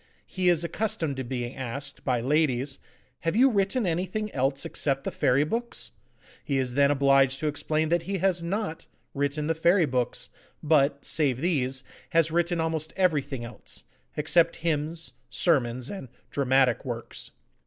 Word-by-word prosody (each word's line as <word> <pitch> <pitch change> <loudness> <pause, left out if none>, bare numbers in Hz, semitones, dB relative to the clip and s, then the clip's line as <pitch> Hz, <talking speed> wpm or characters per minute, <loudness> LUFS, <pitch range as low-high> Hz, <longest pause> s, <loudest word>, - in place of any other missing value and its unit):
He 185 -1 0
is 175 -1 +3
accustomed 170 -5 -1
to 130 - -2
being 120 0 -4
asked, 135 +2 -6
by 125 -3 +1
ladies, 135 -1 +1 0.4
'Have 165 +3 -1
you 260 +3 +6
written 205 +3 +1
anything 185 +5 -2
else 135 +1 0
except 135 -2 -1
the - - -3
Fairy 130 +3 +3
Books?' 235 +9 -3 0.5
He 140 - -1
is 130 -2 -1
then 140 +1 +4
obliged 135 -1 +4
to 155 - -1
explain 155 +1 0
that 170 0 +2
he 195 - 0
has 185 -1 +1
NOT 180 0 -3 0.3
written 145 +1 -1
the 165 - +1
Fairy 170 +2 +4
Books, 125 -3 -1 0.3
but, 145 -2 +3
save 140 -6 +2
these, 135 -5 0 0.3
has 165 -1 +3
written 170 +1 +1
almost 160 -1 -1
everything 145 -9 +1
else, 120 - -9 0.3
except 165 +3 +3
hymns, 160 +1 -1 0.2
sermons, 125 -5 +1
and 195 -9 -7 0.2
dramatic 130 -2 +2
works. 120 -3 -6
150 Hz, 155 wpm, -27 LUFS, 135-170 Hz, 0.5 s, you